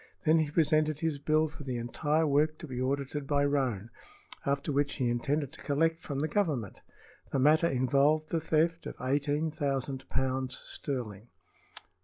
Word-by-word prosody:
Then 160 0 +4
he 155 -2 0
presented 155 -1 +2
his 160 -3 -1
bill 155 +2 +2
for 150 - -12
the 130 -3 -3
entire 150 +7 0
work 155 +1 +2
to 160 - -9
be 125 -2 -4
audited 140 +2 -2
by 145 0 +2
Roane, 125 -7 -1 0.6
after 140 +2 0
which 145 0 +1
he 125 -2 0
intended 140 +4 -1
to - - -11
collect 165 +3 +1
from 140 -2 -3
the 155 - +1
Government. 150 - -1 0.5
The - - 0
matter 155 +5 +4
involved 140 +3 +2
the 165 - 0
theft 165 +1 +1
of - - -7
eighteen 145 +4 0
thousand 135 -3 -2
pounds 130 -1 0
sterling. 115 -6 -5
145 Hz, 165 wpm, -30 LUFS, 130-155 Hz, 0.6 s, Then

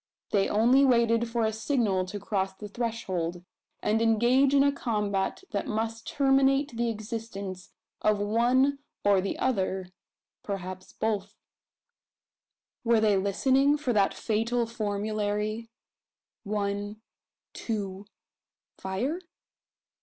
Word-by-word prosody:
They 195 -2 +2
only 240 +6 +5
waited 235 -2 +3
for 230 0 0
a 220 - 0
signal 220 -5 0
to 205 +3 -6
cross 195 -1 -2
the 210 +2 -8
threshold; 190 -7 -3 0.4
and 220 +1 +2
engage 240 +5 +4
in 275 - +6
a 280 - +4
combat 210 - -1
that 200 -3 -2
must 225 +1 -3
terminate 270 -1 +2
the 235 0 0
existence 210 -4 -6 0.3
of 215 -1 +3
one 245 +7 +2 0.3
or 200 -2 +5
the 195 - -3
other 190 -6 -1 0.5
perhaps 185 -2 -6
both. 210 -2 -2 1.5
Were 230 -2 +4
they 215 -2 +3
listening 265 +9 +3
for 270 -5 -1
that 200 -2 +2
fatal 230 +2 0
formulary: 215 0 -2 0.7
One 205 0 -3 0.5
two 200 -3 -4 0.7
fire? 240 - -2
215 Hz, 110 wpm, -28 LUFS, 200-235 Hz, 1.5 s, in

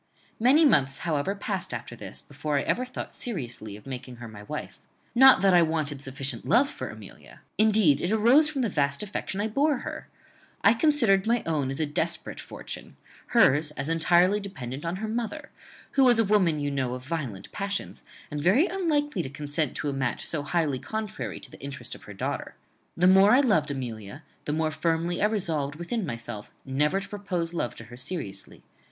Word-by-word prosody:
"Many 270 +8 +6
months, 135 - +4
however, 165 +4 0
passed 195 - -3
after 120 0 -7
this, 105 -3 -7
before 145 +1 -3
I 140 - +1
ever 255 - 0
thought 250 - -7
seriously 120 - -5
of 105 - -17
making 130 -1 -7
her 120 -1 -9
my 105 -2 -10
wife. 105 - -6 0.3
Not 265 +2 +8
that 195 -1 +5
I 175 - +7
wanted 155 -4 -1
sufficient 135 -2 -3
love 245 +6 +4
for - - -6
Amelia. - - -12 0.2
Indeed 210 -9 +5
it 175 - 0
arose 240 +8 +5
from 275 -4 -1
the 230 - +1
vast 140 -1 0
affection 200 -1 -4
I 210 - +1
bore 280 +6 +2
her. - - -6 0.6
I 205 - +7
considered 230 -8 +3
my 235 0 +2
own 150 -5 0
as 135 - -3
a 155 - +2
desperate 160 +3 -2
fortune, - - -8 0.3
hers 150 - +4
as 140 +2 -2
entirely 175 +4 +4
dependent 145 -9 -7
on 165 +2 -1
her 215 +3 -4
mother, 240 +7 -4 0.4
who 275 - +4
was 245 -2 +6
a 225 - +5
woman, 190 -7 +3
you 145 0 -1
know, 130 -3 -1
of 125 0 -9
violent 135 - -4
passions, 200 0 -4 0.3
and 150 0 -3
very 200 - +4
unlikely 315 -6 0
to 130 - -5
consent 145 +2 -3
to 150 - -3
a - - -2
match 130 -3 -1
so 155 - 0
highly 145 -3 0
contrary 195 - -5
to - - -12
the - - -13
interest 140 0 -6
of - - -12
her - - -9
daughter. - - -4 0.4
The 175 - +3
more 190 +2 +7
I 260 - +7
loved 180 - +2
Amelia, 125 -1 -6 0.2
the 145 - -1
more 155 0 0
firmly 165 +2 0
I 210 - +5
resolved 160 -9 -1
within 175 +5 -3
myself 115 -4 -6 0.2
never 150 +8 +1
to 195 - -7
propose 180 -5 -3
love 120 -9 -2
to - - -10
her 120 +2 -12
seriously. 130 - -5
165 Hz, 195 wpm, -27 LUFS, 140-210 Hz, 0.6 s, Not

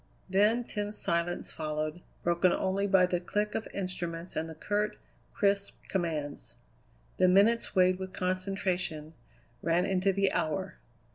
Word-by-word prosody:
Then 210 +5 +3
tense 210 -2 -3
silence 170 +1 -1
followed, 155 +1 -3 0.2
broken 175 +1 +3
only 195 +2 0
by 190 -2 +5
the 180 -1 0
click 210 +4 -1
of 220 - -3
instruments 180 -3 -4
and 160 +1 -2
the 160 - -8
curt, 210 +4 -1 0.4
crisp 200 0 +1
commands. 160 -6 -3 0.6
The 185 - +5
minutes, 205 +5 +4
weighted 185 0 +4
with 190 0 -5
concentration, 185 -4 -2 0.5
ran 170 +2 +2
into 190 0 +2
the 195 0 +2
hour. 185 +4 -2
185 Hz, 135 wpm, -30 LUFS, 170-200 Hz, 0.6 s, by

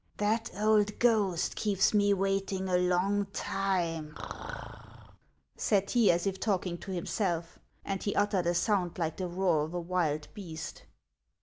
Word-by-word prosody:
" - - -38
That 220 +2 +1
old 210 -1 +3
ghost 210 -7 +2
keeps 205 -2 +2
me 205 -1 +4
waiting 195 -1 0
a 180 - +1
long 180 +3 +2
time," 170 -6 -1 1.4
said 200 -2 +1
he, 235 -4 +4
as 175 +1 +3
if 190 -1 -1
talking 185 -5 -1
to 195 - -9
himself; 175 -2 -2 0.3
and 195 -1 -2
he 200 - -2
uttered 205 -4 +2
a 175 - +2
sound 180 -3 +1
like 165 -2 -2
the 185 - -2
roar 175 -3 +1
of 160 +3 -5
a - - 0
wild 165 -4 -1
beast. 170 -7 -7
190 Hz, 150 wpm, -30 LUFS, 175-205 Hz, 1.4 s, me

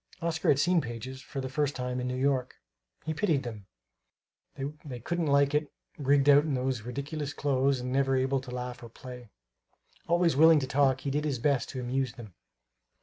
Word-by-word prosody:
Oscar 165 -2 -2
had 140 - +5
seen 175 +4 +3
pages, 130 +1 -7
for 135 0 -6
the 130 - -4
first 145 +2 -1
time, 125 0 -3
in 125 - -2
New 125 - -2
York. 130 -1 0 0.5
He 155 - -1
pitied 155 -5 +1
them; 110 -5 -8 1.2
they 130 -5 -7
couldn't 170 +6 -2
like 140 0 +3
it, 150 0 0 0.2
rigged 140 0 +2
out 145 0 +7
in 150 -3 -1
those 130 -2 -1
ridiculous 140 +5 -5
clothes 135 -2 +1
and 125 +1 -3
never 135 0 +2
able 130 +1 +1
to 130 - -11
laugh 125 0 -5
or 120 - -10
play. 125 0 -11 0.8
Always 170 -2 +3
willing 160 +2 +7
to - - -1
talk, 135 -1 +2
he 140 - -2
did 150 +2 0
his 145 -4 -1
best 140 +2 +1
to 130 - -5
amuse 125 0 -1
them. 110 -6 -11
135 Hz, 195 wpm, -29 LUFS, 125-145 Hz, 1.2 s, out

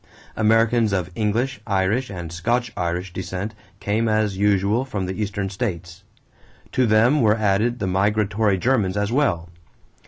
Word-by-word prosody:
Americans 115 0 +3
of 90 -2 -1
English, 110 +3 -1
Irish, 100 +5 0
and 85 -4 -7
Scotch 120 +6 -1
Irish 90 +1 -3
descent 95 +3 -4 0.3
came 110 +3 0
as 110 -2 +1
usual 100 +3 +2
from 105 -8 -4
the 95 +4 -4
Eastern 100 -1 -2
states. 95 -3 -5 0.7
To 130 -2 +2
them 115 +7 +4
were 110 -1 +3
added 110 +3 +1
the 100 - -3
migratory 100 +2 +1
Germans 105 -3 +1
as 100 +1 0
well. 90 - 0
105 Hz, 145 wpm, -22 LUFS, 95-115 Hz, 0.7 s, them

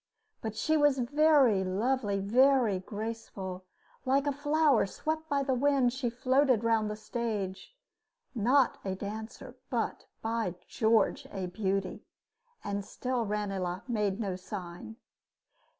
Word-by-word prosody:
But 220 -1 -4
she 315 +7 +1
was 290 -2 +4
very 265 -5 +4
lovely, 205 +2 0
very 240 0 +4
graceful, 195 -3 -6 0.4
"like 270 +2 +2
a 290 - +2
flower 290 -3 +2
swept 315 +8 -3
by 280 -1 +1
the 270 -1 0
wind, 265 -1 +2
she 260 -2 -1
floated 255 -1 +2
round 225 -2 +2
the 210 - -3
stage" 215 - -4 0.6
not 250 +3 +3
a 190 -1 -2
dancer, 220 +6 -7
but, 235 -3 -2 0.2
by 225 -5 -1
George, 230 +5 +2
a 190 -2 -3
beauty! 195 +1 -2 0.6
And 200 0 -3
still 250 +2 -2
Ranelagh 195 -3 -2
made 210 -4 0
no 195 -5 -2
sign. 185 +1 -7
225 Hz, 125 wpm, -30 LUFS, 200-265 Hz, 0.6 s, was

